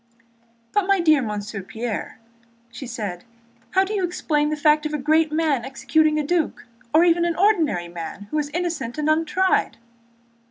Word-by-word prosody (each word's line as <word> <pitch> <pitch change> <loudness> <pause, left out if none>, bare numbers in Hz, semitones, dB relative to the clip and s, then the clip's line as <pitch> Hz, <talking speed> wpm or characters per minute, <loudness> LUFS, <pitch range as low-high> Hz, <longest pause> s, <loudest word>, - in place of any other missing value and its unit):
"But, 410 -2 +1
my 395 -1 +3
dear 310 -4 +4
Monsieur 210 -2 -4
Pierre," 220 +4 -5 0.5
said 230 -9 -5
she, - - -29 0.5
"how 380 - +6
do 395 +2 -4
you 400 -3 -1
explain 300 -4 0
the 305 - -1
fact 300 +1 +3
of 305 - -4
a - - 0
great 310 +2 +2
man 305 -6 +1
executing 310 +4 +1
a 300 - -1
duc—or 290 -3 0
even 340 0 +3
an 340 -1 0
ordinary 325 - +2
man 170 +3 -7
who—is 300 -1 -1
innocent 335 -7 -3
and 300 0 -1
untried?" 325 -3 +1
305 Hz, 160 wpm, -22 LUFS, 240-335 Hz, 0.5 s, how